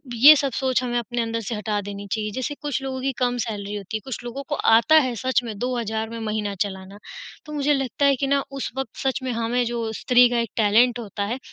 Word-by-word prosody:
ये 280 Hz, +7 st, +9 dB
सब 275 Hz, -2 st, 0 dB
सोच 260 Hz, 0 st, +1 dB
हमें 240 Hz, -1 st, -1 dB
अपने 240 Hz, +1 st, -3 dB
अंदर 230 Hz, 0 st, -2 dB
से 225 Hz, +2 st, -4 dB
हटा 210 Hz, 0 st, -2 dB
देनी 200 Hz, 0 st, -7 dB
चाहिए। 215 Hz, -1 st, -1 dB
जैसे 260 Hz, +3 st, -3 dB
कुछ 285 Hz, -3 st, -2 dB
लोगों 260 Hz, -1 st, -4 dB
की 270 Hz, +1 st, 0 dB
कम 245 Hz, -1 st, +1 dB
सैलरी 205 Hz, -2 st, -5 dB
होती 205 Hz, +1 st, -4 dB
है -, -, -11 dB
कुछ 255 Hz, -3 st, -6 dB
लोगों 245 Hz, +3 st, -6 dB
को 295 Hz, -, 0 dB
आता 235 Hz, +7 st, +4 dB
है 250 Hz, -, -3 dB
सच 255 Hz, +2 st, +1 dB
में 220 Hz, -3 st, -6 dB
₹2000 230 Hz, -2 st, -2 dB
में 225 Hz, -, -5 dB
महीना 210 Hz, -1 st, -2 dB
चलाना। 190 Hz, 0 st, -8 dB, 0.5 s
तो 300 Hz, -, -8 dB
मुझे 295 Hz, 0 st, +2 dB
लगता 270 Hz, 0 st, 0 dB
है 280 Hz, -1 st, +5 dB
कि 275 Hz, +2 st, -2 dB
ना 280 Hz, 0 st, +2 dB, 0.2 s
उस -, -, -3 dB
वक़्त 270 Hz, -, -4 dB
सच 270 Hz, +1 st, 0 dB
में 260 Hz, -, -2 dB
हमें 235 Hz, +1 st, 0 dB
जो 230 Hz, -1 st, -2 dB
स्त्री 250 Hz, 0 st, +6 dB
का 240 Hz, -1 st, 0 dB
एक 230 Hz, -3 st, -2 dB
टैलेंट 230 Hz, +3 st, +4 dB
होता 205 Hz, -3 st, -4 dB
है 255 Hz, -, -5 dB
240 Hz, 245 wpm, -23 LUFS, 220-260 Hz, 0.5 s, ये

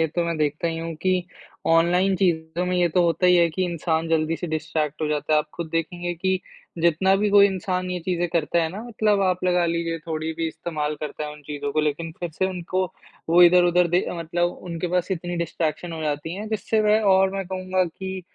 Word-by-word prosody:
ये 160 Hz, -, +3 dB
तो 170 Hz, +2 st, -2 dB
मैं 170 Hz, -1 st, -2 dB
देखता 155 Hz, +2 st, 0 dB
ही 165 Hz, 0 st, -3 dB
हूँ 165 Hz, 0 st, -4 dB
कि 185 Hz, -1 st, +1 dB, 0.4 s
ऑनलाइन 175 Hz, +4 st, +3 dB
चीज़ों 170 Hz, -1 st, 0 dB
में 180 Hz, -, 0 dB
ये 175 Hz, -1 st, +3 dB
तो 175 Hz, +2 st, +2 dB
होता 170 Hz, +2 st, +2 dB
ही 180 Hz, 0 st, +6 dB
है 170 Hz, -1 st, +4 dB
कि 185 Hz, +4 st, -1 dB
इंसान 165 Hz, -1 st, -1 dB
जल्दी 160 Hz, 0 st, +1 dB
से 175 Hz, -, -5 dB
डिस्ट्रैक्ट 155 Hz, -1 st, -2 dB
हो -, -, +1 dB
जाता 150 Hz, 0 st, -1 dB
है। 155 Hz, -, +5 dB
आप 150 Hz, -, -2 dB
खुद 170 Hz, -2 st, -5 dB
देखेंगे 175 Hz, +2 st, -2 dB
कि 190 Hz, +2 st, 0 dB, 0.4 s
जितना 170 Hz, +3 st, +3 dB
भी 205 Hz, 0 st, +1 dB
कोई 200 Hz, 0 st, +7 dB
इंसान 185 Hz, -1 st, -2 dB
ये 180 Hz, -, -2 dB
चीज़ें 175 Hz, 0 st, -1 dB
करता 170 Hz, +1 st, +1 dB
है 160 Hz, -, 0 dB
ना, 195 Hz, +6 st, -7 dB
मतलब 215 Hz, -3 st, +1 dB
आप 185 Hz, -1 st, 0 dB
लगा 180 Hz, -1 st, +3 dB
लीजिए 165 Hz, 0 st, -1 dB
थोड़ी 160 Hz, 0 st, -3 dB
भी 165 Hz, 0 st, -2 dB
इस्तेमाल 155 Hz, -2 st, -3 dB
करता 150 Hz, 0 st, -4 dB
है 150 Hz, -, -6 dB
उन 150 Hz, 0 st, -14 dB
चीज़ों 145 Hz, -1 st, -4 dB
को, 155 Hz, -, +2 dB
लेकिन 155 Hz, +2 st, -2 dB
फिर 175 Hz, -2 st, -3 dB
से 190 Hz, +4 st, -1 dB
उनको 185 Hz, 0 st, -2 dB, 0.5 s
वो 175 Hz, +1 st, +7 dB
इधर-उधर 175 Hz, 0 st, +5 dB
दे 175 Hz, +2 st, +1 dB
मतलब 175 Hz, +1 st, 0 dB
उनके 175 Hz, -1 st, -4 dB
पास 180 Hz, +2 st, 0 dB
इतनी 175 Hz, -1 st, -3 dB
डिस्ट्रैक्शन 165 Hz, 0 st, -2 dB
हो 160 Hz, -1 st, -5 dB
जाती 150 Hz, +3 st, -2 dB
हैं, 210 Hz, +2 st, -6 dB
जिससे 220 Hz, 0 st, 0 dB
वह 215 Hz, +1 st, +4 dB
और 190 Hz, 0 st, +4 dB
मैं 195 Hz, -2 st, -3 dB
कहूँगा 185 Hz, 0 st, -1 dB
कि 190 Hz, +2 st, -6 dB
170 Hz, 225 wpm, -24 LUFS, 160-185 Hz, 0.5 s, कोई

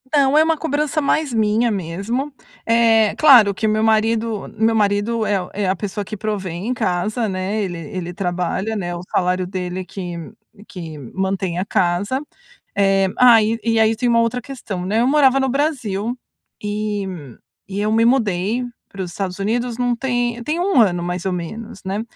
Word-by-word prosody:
Não, 280 Hz, +1 st, +4 dB
é 310 Hz, -, +7 dB
uma 320 Hz, 0 st, +1 dB
cobrança 300 Hz, 0 st, -1 dB
mais 285 Hz, -2 st, 0 dB
minha 220 Hz, +2 st, +2 dB
mesmo. 200 Hz, -, -3 dB, 0.3 s
Eh, 225 Hz, -2 st, +4 dB
claro 245 Hz, -10 st, +7 dB
que 220 Hz, +3 st, -1 dB
meu 215 Hz, +1 st, +1 dB
marido 220 Hz, -1 st, +1 dB
meu 225 Hz, +1 st, +3 dB
marido 210 Hz, +2 st, +1 dB
é 205 Hz, -, +1 dB
a 180 Hz, -2 st, -3 dB
é 200 Hz, -2 st, -1 dB
a 190 Hz, -, +1 dB
pessoa 205 Hz, +1 st, -4 dB
que 215 Hz, -, -6 dB
provê 200 Hz, -3 st, -3 dB
em 190 Hz, +9 st, -3 dB
casa, 215 Hz, +2 st, -1 dB
né, 190 Hz, +3 st, -2 dB
ele 175 Hz, -3 st, -4 dB
ele 175 Hz, +2 st, -6 dB
trabalha, 180 Hz, +4 st, -2 dB
né, 175 Hz, -4 st, -3 dB
o 175 Hz, -, -6 dB
salário 185 Hz, 0 st, +1 dB
dele 180 Hz, -1 st, -4 dB
é -, -, -6 dB
que 180 Hz, -1 st, -6 dB, 0.5 s
que 165 Hz, -5 st, -8 dB, 0.2 s
mantém 190 Hz, -2 st, -1 dB
a 190 Hz, -, -1 dB
casa. 190 Hz, +10 st, 0 dB, 0.5 s
Eh, 195 Hz, -1 st, +3 dB
ai, 230 Hz, -2 st, +6 dB
e 225 Hz, -1 st, +1 dB
aí 220 Hz, 0 st, +5 dB
eu 225 Hz, -, -1 dB
tenho 245 Hz, +2 st, +1 dB
uma 230 Hz, -, +4 dB
outra 230 Hz, +2 st, 0 dB
questão, 220 Hz, -9 st, -6 dB
né: 215 Hz, +4 st, +1 dB
eu 245 Hz, -, +3 dB
morava 270 Hz, -2 st, +4 dB
no 265 Hz, -, +1 dB
Brasil 245 Hz, -5 st, -1 dB, 0.4 s
e 210 Hz, -1 st, -2 dB, 0.6 s
e 195 Hz, +1 st, -3 dB
eu 215 Hz, +1 st, 0 dB
me 225 Hz, +1 st, +4 dB
mudei 230 Hz, -1 st, +1 dB, 0.2 s
para 195 Hz, -1 st, -6 dB
os 180 Hz, -, -5 dB
Estados 185 Hz, +1 st, -4 dB
Unidos 235 Hz, +4 st, -1 dB
não 245 Hz, -1 st, +1 dB
tem 240 Hz, -1 st, -1 dB
tem 310 Hz, +6 st, -2 dB
1 360 Hz, -8 st, +3 dB
ano, 175 Hz, -5 st, +3 dB
mais 180 Hz, +1 st, -3 dB
ou 190 Hz, -, 0 dB
menos, 195 Hz, +5 st, -6 dB
né? 200 Hz, +3 st, -2 dB
215 Hz, 185 wpm, -20 LUFS, 190-240 Hz, 0.6 s, é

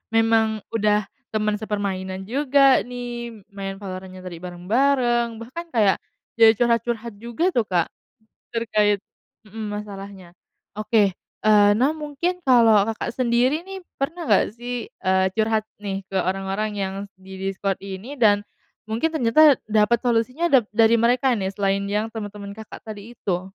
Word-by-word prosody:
memang 225 Hz, -2 st, +2 dB
udah 210 Hz, -1 st, +2 dB, 0.2 s
teman 215 Hz, -1 st, -1 dB
sepermainan 190 Hz, -3 st, -3 dB
juga 275 Hz, +3 st, +4 dB
nih, 240 Hz, -3 st, -6 dB
main 195 Hz, -1 st, -5 dB
Valorant-nya 185 Hz, -1 st, -8 dB
tadi 175 Hz, -2 st, -8 dB
bareng-bareng, 235 Hz, +6 st, +1 dB
bahkan 335 Hz, +9 st, -7 dB
kayak, 205 Hz, -4 st, +3 dB, 0.4 s
jadi 225 Hz, -1 st, +8 dB
curhat-curhat 235 Hz, 0 st, 0 dB
juga, 235 Hz, -, -1 dB
tuh 235 Hz, -, 0 dB
Kak, 175 Hz, -3 st, 0 dB, 0.6 s
terkait 210 Hz, -3 st, +1 dB, 0.5 s
mhm, 220 Hz, +1 st, -6 dB, 0.2 s
masalahnya. 195 Hz, -3 st, -10 dB, 0.5 s
Oke, 210 Hz, -3 st, +2 dB
eee, 210 Hz, -1 st, +3 dB
nah, 255 Hz, +7 st, +3 dB
mungkin 305 Hz, +4 st, -2 dB
kalau 230 Hz, -5 st, +6 dB
Kakak 225 Hz, +2 st, -4 dB
sendiri 255 Hz, +7 st, +1 dB
nih 385 Hz, -1 st, -8 dB, 0.2 s
pernah 320 Hz, +2 st, -3 dB
gak 205 Hz, 0 st, +3 dB
sih, 240 Hz, 0 st, -5 dB, 0.2 s
eee, 190 Hz, 0 st, +2 dB
curhat 220 Hz, -1 st, +1 dB, 0.2 s
nih 195 Hz, -1 st, -4 dB
ke 195 Hz, -1 st, -1 dB
orang-orang 195 Hz, +3 st, -2 dB
yang 190 Hz, -1 st, -2 dB, 0.2 s
di 190 Hz, 0 st, -13 dB
Discord 195 Hz, 0 st, -2 dB
ini 195 Hz, +7 st, -7 dB
dan 210 Hz, -6 st, +3 dB, 0.4 s
mungkin 225 Hz, +9 st, -1 dB
ternyata 295 Hz, 0 st, +5 dB
dapat 215 Hz, +2 st, +3 dB
solusinya 245 Hz, +7 st, +1 dB
dap 245 Hz, -5 st, +4 dB
dari 225 Hz, +1 st, +4 dB
mereka 250 Hz, +2 st, +3 dB
nih 190 Hz, -4 st, -1 dB
selain 195 Hz, 0 st, 0 dB
yang 215 Hz, +2 st, -1 dB
teman-teman 205 Hz, -2 st, -7 dB
Kakak 220 Hz, +1 st, -11 dB
tadi 220 Hz, +2 st, -9 dB
itu? 180 Hz, -2 st, -1 dB
220 Hz, 140 wpm, -23 LUFS, 200-240 Hz, 0.6 s, jadi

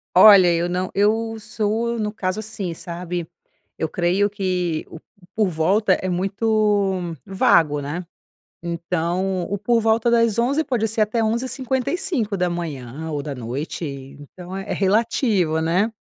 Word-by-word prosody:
Olha, 185 Hz, -3 st, +8 dB
eu 170 Hz, +1 st, 0 dB
não 180 Hz, +1 st, -2 dB
eu 225 Hz, +2 st, +1 dB
sou, 220 Hz, +2 st, -1 dB
no 210 Hz, -1 st, -2 dB
caso 195 Hz, -2 st, -2 dB
assim, 200 Hz, -5 st, -5 dB
sabe, 175 Hz, 0 st, -5 dB, 0.5 s
eu 160 Hz, -, -1 dB
creio 180 Hz, +5 st, +1 dB
que 180 Hz, -5 st, -2 dB
o 160 Hz, -, -10 dB, 0.4 s
por 215 Hz, -2 st, +2 dB
volta 185 Hz, +4 st, +2 dB
é 185 Hz, -, -2 dB
muito 195 Hz, -2 st, 0 dB
vago, 155 Hz, -6 st, +3 dB
né. 165 Hz, +6 st, -5 dB, 0.6 s
Então, 175 Hz, +2 st, -1 dB
o 200 Hz, -, -1 dB
por 230 Hz, +3 st, +2 dB
volta 225 Hz, +1 st, +2 dB
das 230 Hz, -2 st, +3 dB
11 275 Hz, +7 st, +2 dB
pode 240 Hz, -6 st, 0 dB
ser 220 Hz, +1 st, -2 dB
até 220 Hz, +2 st, 0 dB
11h55 215 Hz, -, -2 dB
ou 145 Hz, -2 st, -3 dB
da 145 Hz, -1 st, -5 dB
noite, 130 Hz, +8 st, -5 dB, 0.4 s
então 180 Hz, +6 st, -9 dB
é 195 Hz, -, -6 dB
é -, -, +1 dB
relativo, 200 Hz, -, +1 dB
né? 180 Hz, +7 st, +1 dB
190 Hz, 140 wpm, -22 LUFS, 170-220 Hz, 0.6 s, Olha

